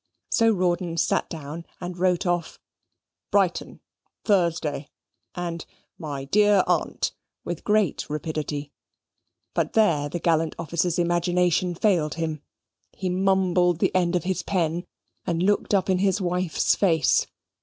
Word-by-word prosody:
So 230 -1 +4
Rawdon 180 -4 0
sate 165 - +1
down, 160 +1 -7 0.2
and 180 -1 -5
wrote 180 +1 +1
off, 175 -2 -1 0.7
"Brighton, 195 -4 0 0.4
Thursday," 170 -7 0 0.5
and 170 -2 -4 0.4
"My 140 -4 -5
dear 205 +4 +4
Aunt," 175 -3 0 0.3
with 170 -1 -4
great 210 -9 +1
rapidity: 150 -1 -4 0.8
but - - -1
there 165 -10 +3
the 175 - -3
gallant 165 -2 +1
officer's 170 +1 -1
imagination 175 0 +1
failed 165 -6 +1
him. 160 -3 -3 0.5
He 185 - -3
mumbled 180 -2 +2
the - - +1
end 180 -1 +2
of 175 - 0
his 185 -1 -1
pen, 175 -2 -1 0.4
and 170 -1 0
looked 205 +2 +1
up 195 -3 +2
in 185 -1 +2
his 195 +1 +2
wife's 180 -2 +1
face. 165 -6 +2
175 Hz, 130 wpm, -25 LUFS, 165-185 Hz, 0.8 s, So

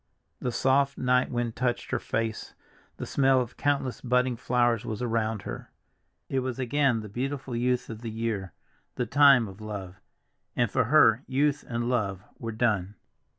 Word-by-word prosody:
The 125 - -2
soft 135 +3 +2
night 125 0 +2
wind 120 -2 -2
touched 125 -1 -2
her - - 0
face, 115 -1 -3 0.4
the - - -5
smell 135 -1 +3
of 125 -1 -4
countless 140 -3 -1
budding 125 0 +1
flowers 120 -1 +1
was 110 -3 -4
around 110 -3 -1
her. - - -7 0.6
It 135 - 0
was 130 -1 -3
again 130 -2 +1
the 105 - -8
beautiful 130 +3 -4
youth 125 +1 0
of 110 -1 -8
the 115 - -5
year, 110 -5 -3 0.4
the 125 - -1
time 135 -2 +6
of 95 +2 -11
love, 95 -4 -7 0.6
and - - +1
for - - +2
her 110 +2 +5
youth 145 +2 +1
and 120 0 -2
love 100 -7 -1 0.2
were 115 - -4
done. 105 -4 0
120 Hz, 165 wpm, -27 LUFS, 110-130 Hz, 0.6 s, time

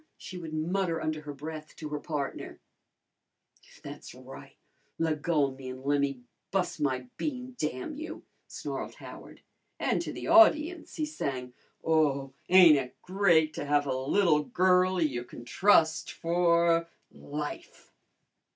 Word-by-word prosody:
she 185 - -10
would 165 -3 -7
mutter 165 +2 -1
under 155 -1 -3
her 150 -1 -7
breath 155 +2 -8
to 155 - -7
her 150 0 -3
partner. 145 -3 -5 1.2
"That's - - -9
right! 70 +1 -12 0.4
Leggo 155 -1 +1
o' 135 - -3
me 130 -1 -9
an' 130 +1 -8
lemme 140 -2 0 0.3
bus' 180 -3 -1
my 130 -3 -1
bean, 255 -4 -4
damn 150 - -3
you!" 315 +3 -7 0.2
snarled - - -6
Howard. - - -12 0.4
And - - 0
to - - -5
the - - -7
audience 335 0 +4
he 310 - -1
sang, 130 - -4 0.3
"Oh, 140 -4 +1 0.2
ain't 180 -5 +8
it 130 -2 -5
great 175 -5 +3
to - - -5
have 145 0 +2
a 130 -2 -1
little 150 +4 +2
girlie 185 +1 +3
you 120 -4 -4
can 120 0 -12
trust 160 +2 +3
for 170 0 +2 0.2
life!" 145 - -7
155 Hz, 140 wpm, -29 LUFS, 140-180 Hz, 1.2 s, ain't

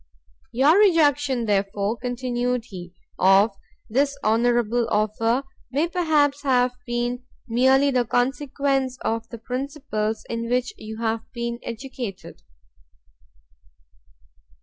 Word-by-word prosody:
"Your 285 - +4
rejection, 290 - +3
therefore," 200 +1 0
continued 245 -1 -2
he, 175 -3 -9 0.3
"of 195 +3 +5 0.4
this 280 +4 +1
honourable 235 +1 +2
offer, 225 +4 +1 0.3
may 295 +6 +1
perhaps 300 -5 +2
have 250 -2 +2 0.2
been 240 +1 -2 0.3
merely 265 +4 +4
the 250 -2 +2
consequence 270 +1 0
of 225 0 -2
the 235 - -7
principles 245 -3 -3
in 230 0 -4
which 250 0 0
you 220 0 -7
have 225 0 -2
been 235 -1 -3
educated. 235 - -7
245 Hz, 105 wpm, -23 LUFS, 225-270 Hz, 0.4 s, of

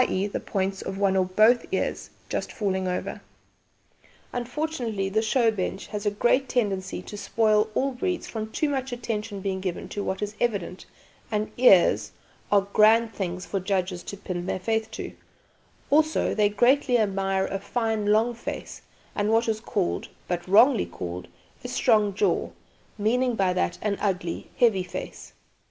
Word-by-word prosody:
e._, 195 +2 -1
the - - -2
points 195 0 -2
of 195 - -5
one 195 -1 +2
or 190 -1 +3
both 215 +6 +4
ears - - -2 0.2
just - - -3
falling 190 -3 -1
over. 180 - -3 1.1
"Unfortunately, 245 -5 -2
the 215 +3 +1
show 225 +1 +3
bench 190 -1 -3
has 210 0 -4
a - - +6
great 240 +5 +2
tendency 195 -6 -1
to 210 - -8
spoil 215 +1 +2
all 275 +1 +1
breeds 350 +8 -2
from 220 -1 -5
too 305 - 0
much 265 -2 -2
attention 220 -4 -4
being 190 -1 -2
given 185 -2 -4
to 205 - -4
what 190 +1 -2
is 210 +1 -4
evident 200 -6 -2 0.4
and 215 0 -1
ears 195 -8 +5 0.4
are 200 -1 +4
grand 225 +1 +5
things 180 -2 -4
for 195 - -2
judges 185 -1 -1
to 200 - -7
pin 180 -2 -5
their - - -1
faith 220 +3 -1
to; 220 - -6 0.8
also, 310 +2 +3
they 210 -1 +3
greatly 250 +4 +3
admire 195 -3 +1
a 195 - -3
fine 220 0 -1
long 220 +3 +3
face 235 - -7 0.3
and 205 +1 0
what 225 +1 +3
is 220 -1 0
called 85 - -1 0.2
but 175 0 -3
wrongly 225 +5 +5
called 90 0 -6 0.4
a - - -4
strong 210 -2 +3
jaw, - - +1 0.5
meaning 240 +4 +1
by 190 -3 +2
that 180 - 0
an 210 -1 +1
ugly, 180 -4 -2
heavy 225 -6 +4
face. 180 - -7
210 Hz, 165 wpm, -26 LUFS, 190-230 Hz, 1.1 s, a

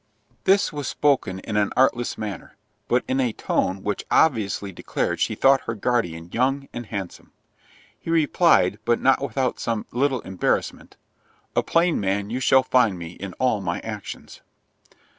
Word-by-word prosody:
This 195 -3 +3
was 145 -2 -4
spoken 140 -10 +1
in 105 -2 -3
an 105 -1 +1
artless 125 -2 +2
manner, 105 -1 -7 0.3
but 125 +1 +2
in 130 - 0
a 125 -4 +1
tone 95 -2 -1
which 105 - -2
obviously 105 -8 +2
declared 85 - -3
she - - 0
thought 135 0 +4
her 115 - -3
guardian 90 -8 -1
young 135 +3 0
and 120 -2 -6
handsome. 100 -3 -7 0.7
He - - -9
replied, 160 - +3
but 120 0 +1
not 135 0 +3
without 130 -1 -1
some 115 -2 -2
little 130 0 0
embarrassment, 95 -1 -2 0.6
"A - - +4
plain 170 0 +2
man 100 +1 -1
you 125 - -2
shall 130 0 +4
find 125 -7 +2
me 85 -1 -7
in 95 +1 -8
all 125 -5 0
my 85 -2 -2
actions." 105 -3 -8
120 Hz, 160 wpm, -23 LUFS, 100-135 Hz, 0.7 s, thought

